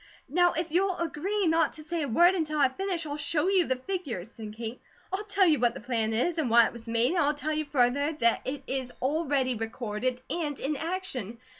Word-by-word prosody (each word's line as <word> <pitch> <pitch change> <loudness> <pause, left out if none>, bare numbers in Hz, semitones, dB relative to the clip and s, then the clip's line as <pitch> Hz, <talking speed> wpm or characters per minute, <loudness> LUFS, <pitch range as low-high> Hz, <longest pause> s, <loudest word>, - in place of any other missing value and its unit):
"Now 350 +4 +3
if 330 0 -3
you'll 370 +2 +1
agree 360 +5 -1
not 325 -2 +2
to 310 - -9
say 330 +2 -3
a 290 - -1
word 345 +10 +5
until 310 -4 -1
I 280 -3 +4
finish, 355 +3 -3
I'll 290 -1 -4
show 300 +3 0
you 380 -3 +4
the 260 - +1
figures," 255 - -5
said 215 -2 -8
Kate. 230 +1 -6 0.3
"I'll 395 +2 -1
tell 405 -2 +3
you 310 -6 +4
what 240 0 +2
the - - -6
plan 225 -2 0
is, 315 +10 +1
and 285 -6 0
why 235 0 +7
it - - -3
was 235 0 -11
made, 230 +2 +3
and 355 - +1
I'll 290 0 +2
tell 300 +2 -2
you 310 0 -1
further 285 +1 +2
that 235 -6 +2
it 275 +1 -4
is 260 -2 -3
already 275 -2 +1
recorded, 230 +2 -3
and 300 -5 -3
in 290 +3 -1
action. 300 - -4
290 Hz, 230 wpm, -28 LUFS, 245-335 Hz, 0.3 s, why